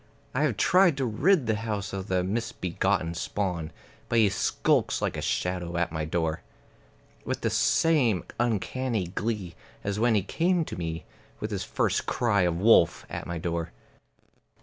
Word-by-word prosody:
I 130 - 0
have 125 -9 -1
tried 180 - +4
to 135 - 0
rid 145 - +2
the 110 -1 +1
house 105 -3 -3
of 95 0 -4
the 90 -2 +1
misbegotten 95 -4 -1
spawn; 85 -2 -3 0.4
But 120 - +1
he 110 -3 +5
skulks 95 - +1
like - - -1
a - - -3
shadow 90 -1 -2
at 90 -1 0
my 80 -1 -2
door, 80 0 -1 0.8
With - - -3
the - - 0
same 135 - +3 0.2
uncanny 120 -3 -1
glee 105 -2 -3 0.3
as 100 +1 -2
when 115 0 +3
he 100 - +2
came 170 - +1
to - - -6
me 80 -2 -4 0.3
With - - -4
his - - -2
first - - 0
cry 110 -5 +2
of 85 -1 +1
wolf 100 -5 +4
at - - -5
my 85 0 -3
door. 85 0 -3
100 Hz, 165 wpm, -27 LUFS, 85-120 Hz, 0.8 s, he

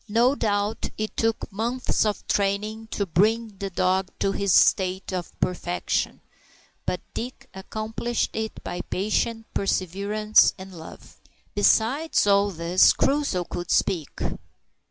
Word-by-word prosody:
No 235 +5 +4
doubt 210 -3 -1
it 215 0 -3
took 225 -1 -1
many 195 - -15 0.2
months 255 -3 0
of 210 - -3
training 210 +2 -1
to 205 -2 -2
bring 210 +4 +1
the 195 - -3
dog 185 +1 +1
to 195 - +1
this 200 -1 0
state 190 +2 +3
of 180 -2 -5
perfection, 180 -1 -1 0.7
but - - -1
Dick 255 +3 -6
accomplished 220 +4 -3
it 220 0 -4
by 175 - -4
patience, 225 +3 -1
perseverance, 200 +3 +2
and 190 0 -10
love. 160 -2 -12 0.4
Besides 230 +10 +3
all 200 0 +4
this, 170 0 +4
Crusoe 275 -10 +1
could 175 0 -6
speak! 165 -6 +1
205 Hz, 130 wpm, -25 LUFS, 185-225 Hz, 0.7 s, No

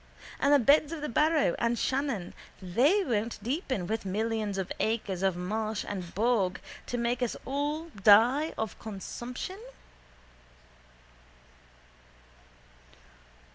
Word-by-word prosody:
And 280 - +3
the 290 - +8
beds 285 +4 +4
of 330 -3 -5
the 300 - -3
Barrow 300 - +3
and 235 0 +1
Shannon 260 -10 -1 0.3
they 255 - +3
won't 230 - -1
deepen 260 - -2
with 220 +4 -2
millions 210 +1 -2
of 190 -1 -3
acres 215 -5 -1
of 190 -2 +1
marsh 215 +4 -2
and 185 -4 -6
bog 210 -4 +1 0.3
to 245 - -2
make 240 +1 -1
us 245 - -1
all 295 +4 -2
die 235 +7 +4
of 220 -2 -4
consumption? 240 - -6
230 Hz, 115 wpm, -29 LUFS, 205-280 Hz, 0.3 s, the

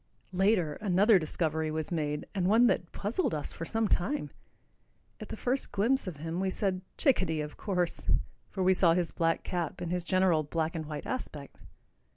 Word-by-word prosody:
Later, 180 -5 +2
another 200 +1 +5
discovery 160 -1 -1
was 155 +1 -3
made, 150 -3 -1
and 185 -3 0
one 225 +5 +6
that 175 -7 +1
puzzled 210 - -1
us 150 - -3
for 165 - -5
some 225 +4 0
time. 210 +11 0 0.9
At - - -8
the - - -5
first 260 +2 -1
glimpse 230 +4 +1
of 180 - -4
him 165 +3 -4
we 190 0 0
said, 185 -1 -1 0.2
"Chickadee, 185 - +2
of 150 0 -6
course," 180 -4 -2 0.4
for 190 - -2
we 185 +1 +5
saw 175 -3 +4
his 175 -2 0
black 165 -1 0
cap 175 -4 -3
and 175 -1 -4
his 180 -1 -1
general 185 -3 +3
black 160 +2 -2
and 160 -2 -4
white 150 -1 -5
aspect. 150 - -5
180 Hz, 185 wpm, -30 LUFS, 160-200 Hz, 0.9 s, one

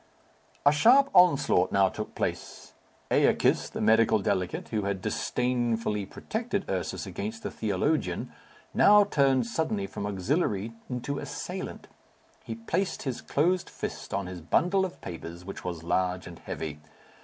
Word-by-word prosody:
A 145 - +8
sharp 250 - +5
onslaught 145 - +5
now 100 -1 +4
took - - -6
place. - - -4 0.4
Æacus, - - +3
the - - -5
medical 110 0 +4
delegate, 95 -2 -2
who 110 -2 -1
had 100 -1 -2
disdainfully 115 -1 -1
protected 220 -3 -3
Ursus 90 -4 -3
against 110 +3 -5
the - - -3
theologian, 105 - -1 0.4
now 210 0 +7
turned 135 - +2
suddenly 160 - -1
from 100 - -5
auxiliary 105 - -1 0.2
into 130 +3 -3
assailant. - - -6 0.6
He 115 - -5
placed 115 - -2
his 130 -4 -3
closed 175 +5 +1
fist - - -6
on 100 0 -1
his 90 -1 -7
bundle 180 - +2
of 185 - -8
papers, 85 +1 -8
which 100 - -7
was 85 -3 -5
large 90 +1 0
and 85 -2 -10
heavy. 75 -1 -5
115 Hz, 140 wpm, -28 LUFS, 95-155 Hz, 0.6 s, A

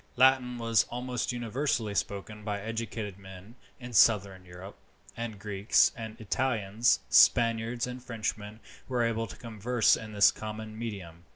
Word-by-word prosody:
Latin 130 -1 +4
was 115 -3 +2
almost 125 0 -3
universally 120 -2 -2
spoken 100 +1 -4
by 105 -1 -3
educated 110 -2 -5
men 95 +2 -12 0.3
in 125 -1 -9
southern 100 -4 +3
Europe, 90 +3 -11 0.4
and 115 -2 -5
Greeks, 100 +1 +2
Italians, 110 -1 0
Spaniards, 115 0 +4
and 125 0 -8
Frenchmen 110 -2 -5 0.3
were 125 -2 0
able 115 0 -1
to 90 - -11
converse 115 +1 +1
in 110 -1 -8
this 100 -1 +6
common 110 0 -7
medium. 95 -7 -7
110 Hz, 130 wpm, -29 LUFS, 105-120 Hz, 0.4 s, this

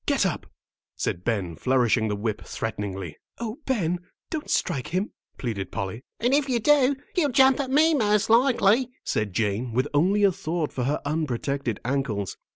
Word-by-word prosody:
"Get - - +2
up," - - -2 0.5
said 90 - -2
Ben, 95 -8 -1
flourishing 120 0 +2
the 105 - -1
whip 105 +1 -3
threateningly. 95 -6 -5 0.2
"Oh, 235 +3 -5
Ben, 180 -9 0 0.3
don't 315 -2 -4
strike 130 -3 0
him," 185 +5 -1 0.3
pleaded 110 -7 -4
Polly. 100 +5 -4 0.2
"And 245 +3 +2
if 285 -1 +2
you 245 -2 +2
do, 280 +1 +4 0.2
he'll 325 -6 +2
jump 265 +1 +5
at 270 -2 -1
me, 310 +4 +4
most 210 -5 +2
likely," 235 0 +4
said 105 -1 -1
Jane, 110 +4 -1
with 130 +3 +1
only 190 +8 +3
a 200 - +6
thought 165 -2 -3
for 125 - -2
her 145 +3 0
unprotected 140 -5 -2
ankles. 120 -8 -1
150 Hz, 165 wpm, -25 LUFS, -, 0.5 s, a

